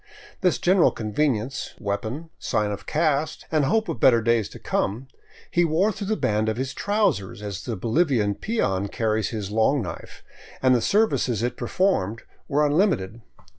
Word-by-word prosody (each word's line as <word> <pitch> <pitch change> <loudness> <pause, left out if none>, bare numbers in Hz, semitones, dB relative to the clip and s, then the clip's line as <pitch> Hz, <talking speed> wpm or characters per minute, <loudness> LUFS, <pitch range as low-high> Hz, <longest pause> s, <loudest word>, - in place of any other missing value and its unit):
This 180 -3 +2
general 185 0 +4
con 105 -2 -6
venience, 130 -2 -1
weapon, 110 +10 -4
sign 105 -1 0
of 100 - -7
caste, 155 -1 0
and 155 -3 +2
hope 220 +10 +1
of - - -4
better 120 0 +6
days 115 -2 +1
to - - -11
come, 120 +7 -2 0.4
he 175 - +3
wore 170 +6 +2
through 200 -1 -6
the 215 +1 0
band 105 +1 +1
of 110 - -2
his 130 +1 -3
trousers, 165 - 0
as 100 -2 -5
the 120 - -3
Bolivian 115 - +1
peon 100 - -1
carries 110 0 -1
his 105 -3 -5
long 110 +5 +2
knife, 85 -4 -8 0.4
and 130 -1 +4
the 120 - +3
services 140 - +1
it 120 - -1
performed 115 - 0 0.2
were 150 +1 +2
unlimited. 145 - +1
125 Hz, 170 wpm, -24 LUFS, 105-160 Hz, 0.4 s, better